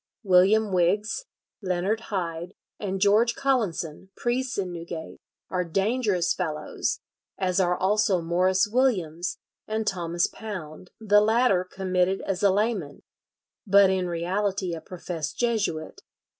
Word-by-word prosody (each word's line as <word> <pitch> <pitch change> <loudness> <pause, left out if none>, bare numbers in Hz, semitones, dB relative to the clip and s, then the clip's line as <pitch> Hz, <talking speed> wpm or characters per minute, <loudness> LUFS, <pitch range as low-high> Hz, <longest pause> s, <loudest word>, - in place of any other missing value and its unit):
William 200 +3 +4
Wigges, 200 - +1 0.4
Leonard 190 +3 0
Hide, 175 -2 -3 0.2
and 195 -2 -3
George 210 +4 +4
Collinson, 195 - -1
priests 245 +1 -1
in 185 -3 -2
Newgate, 170 -1 -7 0.3
are 180 -1 0
dangerous 195 0 +1
fellows, 155 -4 -3 0.4
as 185 -1 0
are 180 -1 +2
also 205 0 +2
Morris 180 +4 +2
Williams 190 -8 0 0.3
and 220 0 -2
Thomas 175 -3 0
Pounde, 185 -5 -7
the 210 -1 +4
latter 220 -3 +3
committed 185 0 0
as 195 -2 -3
a 200 - +5
layman, 200 -7 -1 0.6
but 200 -1 +6
in 185 -1 0
reality 185 +2 -1
a 165 - -5
professed 170 -4 -6
Jesuit. 225 - -1
190 Hz, 120 wpm, -26 LUFS, 175-210 Hz, 0.6 s, but